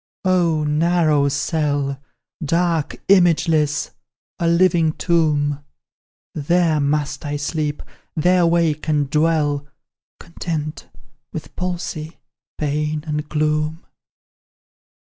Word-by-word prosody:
Oh! 170 -4 +2
narrow 155 -1 +2
cell; 145 -2 -1 0.4
Dark 165 0 0
imageless 165 -5 +3 0.5
a 170 - +1
living 170 -2 +3
tomb! 150 -5 +1 0.7
There 160 +1 +2
must 145 0 -1
I 145 -1 -3
sleep, 150 0 -2 0.3
there 175 +2 +3
wake 165 -2 +1
and 145 -3 +1
dwell 150 -2 +1 0.5
Content, 160 -3 -5 0.4
with 160 - -8
palsy, 175 -3 -4 0.4
pain, 150 0 -1
and 150 -1 -3
gloom." 155 +1 -1
155 Hz, 90 wpm, -20 LUFS, 150-170 Hz, 0.7 s, imageless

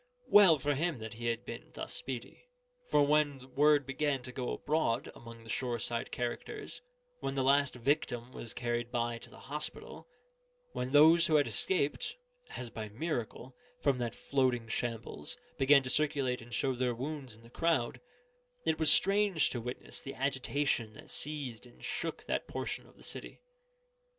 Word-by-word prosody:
Well 195 -6 +8
for 145 +1 0
him 160 +1 0
that 110 -1 -7
he 120 +1 -4
had 115 +1 -1
been 115 - -7
thus - - -5
speedy. 130 - -6 0.4
For 145 - +5
when 145 -3 +1
word 145 -1 +5
began 135 0 0
to 125 - -6
go 125 -1 -3
abroad 145 -6 0
among 115 -1 -11
the 115 - -13
shore 125 -2 -1
side 115 +1 -1
characters, 120 -1 -4 0.4
when 135 - -3
the 135 - +1
last 140 0 +4
victim 125 -2 0
was 115 -3 -8
carried 120 0 -2
by 120 -1 -1
to - - -12
the - - -14
hospital, 150 - -6 0.7
when 125 - -2
those 160 +4 +7
who 155 - +3
had 145 -1 +5
escaped 185 - +1 0.4
(as 120 -2 -5
by 110 -1 -5
miracle) 125 0 -4 0.2
from 135 -3 +2
that 120 -1 -2
floating 130 -4 +1
shambles, 115 - -3 0.2
began 140 +1 +6
to 130 - -4
circulate 140 -4 +1
and 115 +1 -7
show 135 - +1
their 125 -1 0
wounds 135 -2 -5
in 115 - -18
the 115 - -16
crowd, 160 -8 +1 0.6
it 160 0 +1
was 160 -2 +5
strange 195 -4 +4
to 120 - -3
witness 125 +2 -6
the 135 - -7
agitation 130 -3 0
that - - -11
seized 135 -6 -4
and 120 - -18
shook - - -3
that - - -2
portion - - -4
of - - -21
the - - -16
city. - - -5
130 Hz, 170 wpm, -33 LUFS, 120-145 Hz, 0.7 s, Well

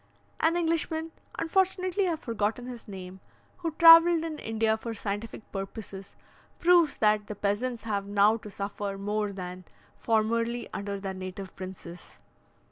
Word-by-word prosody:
An 330 +2 +3
Englishman 325 -1 0 0.3
(unfortunately 370 +2 +1
I - - +1
have 325 -1 -4
forgotten 225 0 -2
his 245 -2 -8
name) 190 -2 -8 0.4
who 345 -2 -2
travelled 330 +1 +8
in 315 -2 -5
India 220 0 +1
for 225 +1 -6
scientific 205 +1 -5
purposes, 195 0 -7 0.4
proves 345 -3 +4
that 210 -1 +2
the 210 - -5
peasants 210 +4 -1
have 200 -3 -2
now 205 +2 +4
to 210 - -10
suffer 200 0 -4
more 210 +1 -1
than 185 -1 -7 0.4
formerly 230 +1 0
under 200 0 -4
their 195 -1 -4
native 185 +1 -7
princes. 185 -2 -9
215 Hz, 140 wpm, -28 LUFS, 200-315 Hz, 0.4 s, travelled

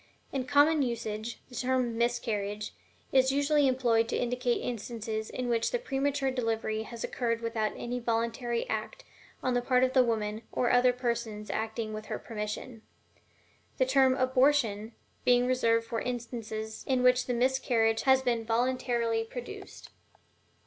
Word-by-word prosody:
In 265 -2 -1
common 290 +2 +5
usage, 230 -2 -3
the - - -17
term 250 -1 0
"miscarriage" 215 -3 -1 0.4
is 260 0 +4
usually 285 +1 +3
employed 235 -3 +2
to - - 0
indicate 245 0 0
instances 220 -2 -4
in 255 -1 -4
which 230 -1 +1
the - - 0
premature 275 - -1
delivery 225 -3 -1
has 230 +1 -7
occurred 230 -2 -1
without 225 -2 -1
any 245 +1 -3
voluntary 235 +1 -1
act - - -4 0.4
on 255 - +1
the 245 - +2
part 250 0 +3
of 260 0 +2
the 260 - +6
woman, 215 -2 -1
or 245 - +1
other 250 0 +5
persons 235 -4 -3
acting 220 0 -3
with 215 0 -6
her - - -3
permission; 220 +1 -6 1.0
the 260 - +3
term 260 0 +4
"abortion" 255 -5 +2 0.3
being 245 0 +4
reserved 230 -3 +2
for 230 0 -3
instances 225 -3 -5
in 255 -2 +2
which 250 0 +4
the 250 - 0
miscarriage 235 -3 +2
has 265 0 +4
been 235 -2 0
voluntarily 235 -1 0
produced. 245 +2 -9
240 Hz, 150 wpm, -30 LUFS, 225-255 Hz, 1.0 s, the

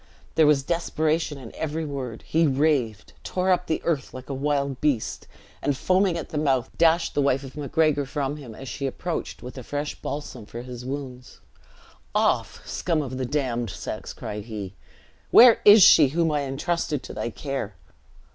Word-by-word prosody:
There 160 -2 +5
was 145 -2 +4
desperation 160 -1 -1
in 125 -4 -10
every 160 +1 -3
word. 130 -6 -5
He 165 0 +2
raved; 135 -7 0
tore 185 0 0
up 180 0 +1
the 160 - -1
earth 150 -7 -2
like 130 +2 -8
a - - -2
wild 140 -1 -1
beast; 140 -7 -1 0.3
and, 145 -2 0
foaming 185 +1 +2
at 160 - -6
the 150 - -2
mouth, 135 -5 +1
dashed 165 +1 +3
the 145 - +1
wife 140 0 +1
of 135 - -10
Macgregor 145 0 +1
from 145 +1 -2
him, 125 -7 -10
as 135 - -9
she 140 +2 -3
approached 165 +6 -4
with 125 +2 -8
a - - -8
fresh 145 +4 -3
balsam 130 -6 -6
for 120 +1 -7
his 125 -1 -8
wounds. 130 -1 -7 0.8
"Off, - - 0
scum 165 -4 -1
of 130 -1 -6
a - - -1
damned 125 -4 -1
sex!" - - -6
cried 105 0 -6
he. 105 -4 -6 0.6
"Where 240 -1 +8
is 205 -1 +9
she, 150 -4 +8
whom 165 +3 +1
I 150 - +1
intrusted 150 +2 -2
to - - -8
thy - - -3
care?" 135 -5 -5
140 Hz, 180 wpm, -25 LUFS, 130-160 Hz, 0.8 s, is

